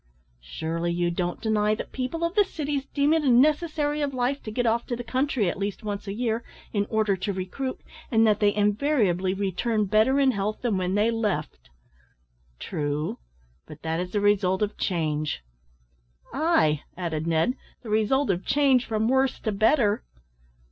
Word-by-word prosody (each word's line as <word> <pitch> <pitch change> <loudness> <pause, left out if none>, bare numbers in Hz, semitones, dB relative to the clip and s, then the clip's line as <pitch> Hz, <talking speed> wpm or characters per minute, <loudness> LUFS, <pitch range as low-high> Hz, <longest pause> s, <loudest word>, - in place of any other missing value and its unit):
"Surely 165 - -3
you 175 0 0
don't 175 0 -2
deny 215 -1 +2
that - - -7
people 265 +6 -3
of 335 +1 0
the 415 0 +5
cities 290 -6 -3
deem 285 +2 +2
it 320 -1 +2
a 275 - +2
necessary 300 +3 +2
of 280 -2 -1
life 255 +3 0
to - - -7
get 245 +3 -1
off 230 +1 +2
to 240 - -2
the 245 - -6
country 260 -3 0
at 175 - -2
least 200 +2 -3
once 205 -1 -4
a - - -2
year, 230 0 -1 0.3
in 205 -1 0
order 215 -3 +2
to 190 +2 -3
recruit, 195 +8 -4 0.3
and 225 -1 +4
that 210 -1 +3
they 205 -1 +4
invariably 205 - +1
return 205 +3 0
better 220 +7 +3
in 270 -1 +4
health 210 0 -3
than 235 -5 +1
when 185 0 -1
they 215 +3 +3
left?" 185 - -3 0.9
"True; 150 - -3 0.5
but 155 - -12
that 160 0 -1
is 180 0 -3
the 205 +2 -1
result 200 -1 +2
of 210 - -2
change." 155 - -1 0.9
"Ay," 265 - +2 0.2
added 165 -3 -3
Ned, 165 +9 +2 0.3
"the 220 - -6
result 220 +4 +2
of 180 0 -2
change 270 -3 +3
from 220 -1 0
worse 265 +1 +2
to 215 - -1
better." 215 +1 +2
215 Hz, 175 wpm, -26 LUFS, 185-260 Hz, 0.9 s, the